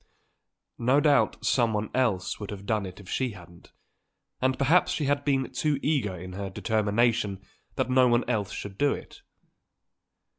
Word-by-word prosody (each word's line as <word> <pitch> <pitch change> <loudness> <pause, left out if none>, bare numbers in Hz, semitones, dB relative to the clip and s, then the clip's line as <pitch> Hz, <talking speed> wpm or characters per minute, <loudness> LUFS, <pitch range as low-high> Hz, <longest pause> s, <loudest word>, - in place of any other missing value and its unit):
No 130 +4 +3
doubt 145 -1 +2
someone 110 -4 +1
else 110 -8 0
would 105 - -6
have 100 -1 -7
done 105 -2 0
it 90 - -11
if 100 - -13
she 130 +4 -1
hadn't; 85 -3 -15 0.7
and 130 0 +1
perhaps 155 +6 +3
she 150 - -1
had 145 +1 +1
been 135 -3 0
too 150 -2 0
eager 125 -12 0
in 90 +1 -8
her 100 +1 -4
determination 110 0 +1 0.4
that - - 0
no 130 0 +5
one 120 0 +2
else 105 -6 -1
should 100 -1 -7
do 145 -1 +3
it. - - -10
115 Hz, 160 wpm, -27 LUFS, 100-130 Hz, 0.7 s, no